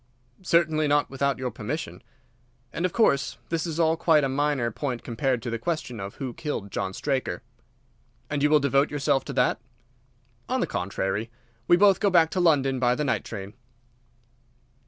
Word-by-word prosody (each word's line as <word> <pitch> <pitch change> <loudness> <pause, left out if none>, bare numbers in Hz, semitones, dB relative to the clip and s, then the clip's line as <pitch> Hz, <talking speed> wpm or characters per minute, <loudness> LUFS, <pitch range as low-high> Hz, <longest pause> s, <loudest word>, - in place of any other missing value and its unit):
"Certainly 160 -4 +2
not 145 -1 +2
without 140 0 0
your 125 -1 -3
permission." 135 +9 -5 0.7
"And 180 - 0
of - - -10
course 140 - +2
this 165 +1 -1
is 165 0 -4
all 160 -1 +3
quite 160 -2 +3
a 135 - +1
minor 135 -3 0
point 125 0 -4
compared 125 0 -1
to 120 - -3
the 115 - -3
question 125 -5 -3
of 100 +1 -6
who 130 -4 -5
killed 110 -10 -5
John 95 0 -3
Straker." 135 -3 -2 0.8
"And 145 -1 -2
you 150 - +4
will 150 0 +5
devote 140 +1 +2
yourself 140 -2 +1
to - - -5
that?" 125 -2 +1 0.9
"On 260 +1 0
the - - +1
contrary, 95 +3 -2 0.4
we 175 - +6
both 195 -1 +5
go 205 - +3
back 165 -3 +4
to 185 - -1
London 135 -6 +3
by 125 -1 +2
the 150 - -2
night 130 - 0
train." 100 -2 -7
140 Hz, 175 wpm, -26 LUFS, 125-160 Hz, 0.9 s, we